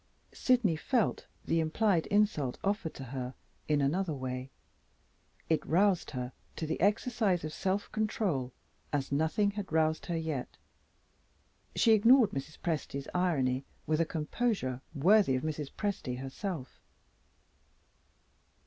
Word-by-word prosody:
Sydney 240 -9 +3
felt 230 +8 0 0.2
the 165 - +2
implied 165 +2 +2
insult 205 - +1
offered 195 -4 -1
to 135 - -7
her 130 0 -5 0.3
in 150 -1 +2
another 160 +4 0
way. 130 0 -4 1.0
It 160 - +1
roused 185 +2 +2
her 125 -2 -4 0.2
to 160 - -3
the 160 - -3
exercise 205 -2 +2
of 155 0 -4
self 195 +1 -1
control 195 - -1 0.4
as 140 -2 -1
nothing 160 +8 +2
had 205 -1 -6
roused 160 +1 +1
her 170 -2 -1
yet. 160 -6 -4 1.2
She 230 - +4
ignored 230 +2 +6
Mrs. 140 +3 -5
Presty's 145 -4 -3
irony 140 -8 +1 0.2
with 155 +2 +1
a - - +3
composure 155 - -1
worthy 180 0 +5
of 130 - -2
Mrs. 150 -2 -3
Presty 170 -12 -3
herself. 135 +2 -5
160 Hz, 125 wpm, -31 LUFS, 140-200 Hz, 1.2 s, ignored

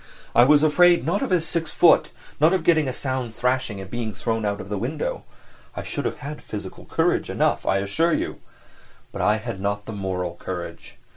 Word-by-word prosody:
I 120 - +7
was 150 +2 +5
afraid 175 0 +5
not 175 +6 0
of 270 - -1
his 170 -3 +1
six 165 -2 -2
foot, - - +5 0.3
not 155 +4 +5
of 185 -3 +1
getting 160 -3 +3
a - - 0
sound 130 -3 -3
thrashing 125 -4 0
and 95 - -7
being 110 -1 -4
thrown 115 +1 -2
out 100 0 -2
of 95 - -7
the 100 -1 -3
window; 140 +7 -3 0.5
I - - -3
should - - -4
have - - -2
had 150 +1 -6
physical 100 -3 -8
courage - - 0
enough, - - 0
I 95 - +3
assure 145 +13 +1
you; - - -4 0.7
but - - -5
I 105 - +3
had 110 -3 -5
not 100 +1 -2
the 110 - -6
moral 90 -3 -3
courage. 90 -1 -7
120 Hz, 205 wpm, -23 LUFS, 100-155 Hz, 0.7 s, I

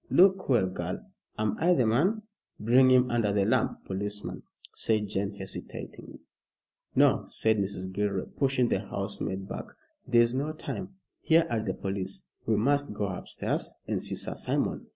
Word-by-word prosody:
Look 190 -1 +5
well, 120 -7 +4
girl. 95 - -4 0.3
Am 110 -1 0
I 175 +2 +4
the 125 - +3
man?" 180 - +2 0.4
"Bring 125 +4 +5
him 125 -1 +5
under 115 -4 +2
the 100 -1 +2
lamp, - - +1
policeman," 105 +2 -4 0.3
said 110 -2 0
Jane, 100 +1 -2
hesitating. 95 0 -8 0.8
"No!" - - +4
said 110 -1 +1
Mrs. 95 -1 -3
Gilroy, 100 -1 -1
pushing 130 -3 +1
the - - +2
housemaid 100 -1 -4
back, - - -5 0.4
"there 120 -1 +6
is 115 +1 0
no 145 +4 -1
time. 185 +4 -6 0.3
Here 165 0 +4
are 115 - +1
the 95 -4 -2
police. 95 -1 -3 0.2
We 110 - +3
must 140 +2 +1
go 100 -1 -1
upstairs 95 - -3
and - - -1
see - - -3
Sir - - -4
Simon. - - -1
110 Hz, 160 wpm, -29 LUFS, 100-135 Hz, 0.8 s, there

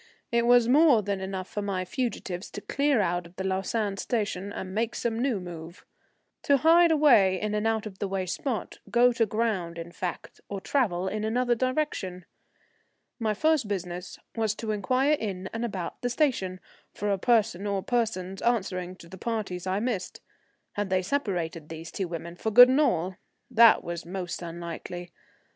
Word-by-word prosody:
It 235 0 +2
was 245 -1 +6
more 275 -4 +5
than 195 -1 -2
enough 190 -1 -4
for 210 - -4
my 195 -2 -2
fugitives 195 -4 -3
to 205 - -6
clear 280 -2 +1
out 175 -2 -1
of 170 - -21
the 190 - -4
Lausanne 195 +2 -1
station 205 -4 -2
and 190 -1 -6
make 225 +2 -1
some 230 -1 -1
new 250 -6 +1
move, 170 -1 -9 0.6
to 280 - +4
hide 340 +1 +7
away 245 - +5
in 210 0 -2
an 210 +1 0
out 225 -1 0
of 195 -3 -8
the 200 - -1
way 190 -1 -2
spot, 230 +6 -3
go 245 +1 +5
to 230 -1 +2
ground 200 -6 -1
in 170 0 -7
fact, 180 0 -6
or 200 - -4
travel 190 -7 0
in 210 +2 -2
another 240 +3 +1
direction. 250 - -2 0.9
My 215 -2 0
first 310 -1 +2
business 180 -2 -4 0.2
was 220 -2 0
to 220 -1 -3
inquire 255 +8 +2
in 195 -8 -3
and 225 +1 -3
about 190 -7 -4
the 245 - 0
station 235 -9 0 0.3
for 205 +1 -2
a 195 - 0
person 215 -4 +2
or 200 -2 -1
persons 195 -6 -1
answering 185 -6 -1
to 170 - -14
the 190 +2 -11
parties 195 -6 -3
I 190 +2 0
missed. 215 -5 -3 0.5
Had 205 -1 -3
they 185 0 +1
separated, 180 - -2
these 160 0 -8
two 190 - -3
women, 170 0 -6
for 220 - -1
good 245 +3 +9
and 265 +4 +4
all? 185 - +1 0.3
That 230 -1 +7
was 170 -1 -5
most 180 0 -5
unlikely. 170 +1 -6
205 Hz, 180 wpm, -27 LUFS, 185-235 Hz, 0.9 s, good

